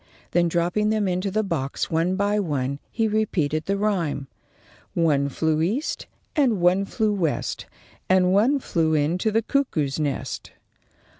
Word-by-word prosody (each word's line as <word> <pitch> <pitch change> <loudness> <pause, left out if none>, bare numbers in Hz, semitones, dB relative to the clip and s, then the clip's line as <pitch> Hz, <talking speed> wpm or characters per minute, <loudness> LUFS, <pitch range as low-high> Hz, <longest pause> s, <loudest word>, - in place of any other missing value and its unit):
Then, 175 0 +3
dropping 175 +5 +1
them 215 -2 +1
into 185 +2 -1
the 215 +3 0
box, 155 -8 -2
one 165 +3 +1
by 205 +1 +1
one, 140 -6 -2
he 225 -1 0
repeated 170 -8 0
the 200 0 0
rhyme: 175 -10 -1 0.7
"One 145 -4 +2
flew 155 +2 0
east 220 - -1 0.3
and 255 - +3
one 180 +3 +3
flew 215 +1 0
west. 170 -7 -2 0.4
And 185 0 +4
one 235 +9 +4
flew 165 - 0
into 165 +8 +1
the 225 +1 +1
cuckoo's 160 - 0
nest." 145 -3 -3
180 Hz, 145 wpm, -24 LUFS, 155-210 Hz, 0.7 s, And